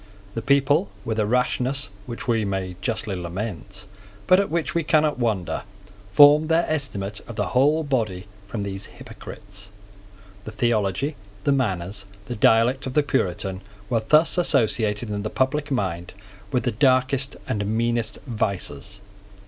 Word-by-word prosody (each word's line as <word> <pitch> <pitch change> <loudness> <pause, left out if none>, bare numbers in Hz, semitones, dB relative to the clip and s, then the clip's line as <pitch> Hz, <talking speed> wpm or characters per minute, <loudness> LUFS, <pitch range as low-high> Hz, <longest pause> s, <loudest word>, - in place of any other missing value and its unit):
The 115 - -3
people, 140 -3 +3 0.2
with 110 -1 -1
a 105 - +1
rashness 125 -1 0 0.2
which 120 0 -7
we 115 -2 +2
may 95 -2 -3
justly 110 -4 -2
lament, 95 +1 -5 0.4
but 185 - +6
at 200 - 0
which 170 0 -1
we 170 -1 +1
cannot 150 -3 +2
wonder, 95 -9 -1 0.5
formed 145 +7 +7
their 165 +1 +3
estimate 105 -10 -3
of 115 - -7
the 105 -3 -1
whole 145 - +3
body 110 -10 -1 0.2
from 100 0 -4
these 100 0 -5
hypocrites. 100 -1 -11 0.7
The 110 - -7
theology, 110 - 0 0.3
the - - +2
manners, 100 -7 -1 0.2
the 120 - -5
dialect 115 +5 +3
of 130 - -6
the 150 - +4
Puritan 95 -7 -1 0.3
were 115 -2 +2
thus 155 +5 +4
associated 115 -8 +1
in 105 0 -2
the 105 - -3
public 140 +4 0
mind 95 -9 -2 0.4
with 125 -3 +1
the 120 - +1
darkest 130 +3 +2
and 105 -1 -1
meanest 115 +1 0
vices. 100 - -3
115 Hz, 150 wpm, -24 LUFS, 100-135 Hz, 0.7 s, formed